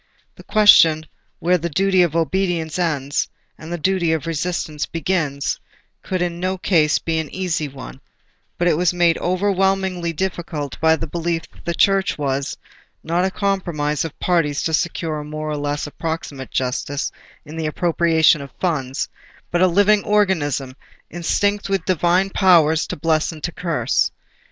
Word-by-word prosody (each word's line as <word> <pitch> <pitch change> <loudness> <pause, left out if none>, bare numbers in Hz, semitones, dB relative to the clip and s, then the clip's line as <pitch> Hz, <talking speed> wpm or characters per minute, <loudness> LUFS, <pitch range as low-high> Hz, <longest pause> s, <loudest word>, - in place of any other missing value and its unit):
The - - -14
question 165 -7 +6 0.3
where 180 +1 +2
the 170 +2 -3
duty 190 +3 +2
of 170 -3 +1
obedience 165 -1 0
ends, 145 -5 0 0.3
and 160 +2 -10
the 175 - -2
duty 175 -1 +1
of 160 -2 -2
resistance 160 -2 -2
begins, 155 -4 -1 0.4
could 185 -2 -2
in 170 -1 -3
no 185 +1 -1
case 160 -5 +3
be 160 -1 -1
an 155 -2 -4
easy 175 -5 -2
one; 65 - -10 0.6
but 175 - +1
it 170 - +4
was 180 0 +1
made 170 -2 +3
overwhelmingly 190 -1 0
difficult 165 -5 -4
by 160 0 +4
the 160 - -4
belief 165 +1 -2
that - - -19
the 170 - -1
Church 195 -1 +2
was—not 145 +5 -3
a - - +1
compromise 175 -7 -1
of 165 - -7
parties 165 -5 +1
to 160 - -1
secure 160 -1 -1
a - - -6
more 155 +1 -5
or 150 - -2
less 145 0 -2
approximate 150 -3 -5
justice 130 +2 -2 0.3
in 150 +2 -9
the 160 -1 -2
appropriation 165 -1 +3
of 140 - -8
funds, 135 -7 -1 0.4
but—a 175 +2 +4
living 205 +3 +4
organism, 150 -11 +1 0.4
instinct 200 +5 0
with 195 -3 0
Divine 185 +2 +2
power 170 -6 +5
to 160 - -2
bless 155 +1 +1
and 155 -2 -11
to 175 - -2
curse. 170 -2 0
165 Hz, 155 wpm, -20 LUFS, 150-180 Hz, 0.6 s, question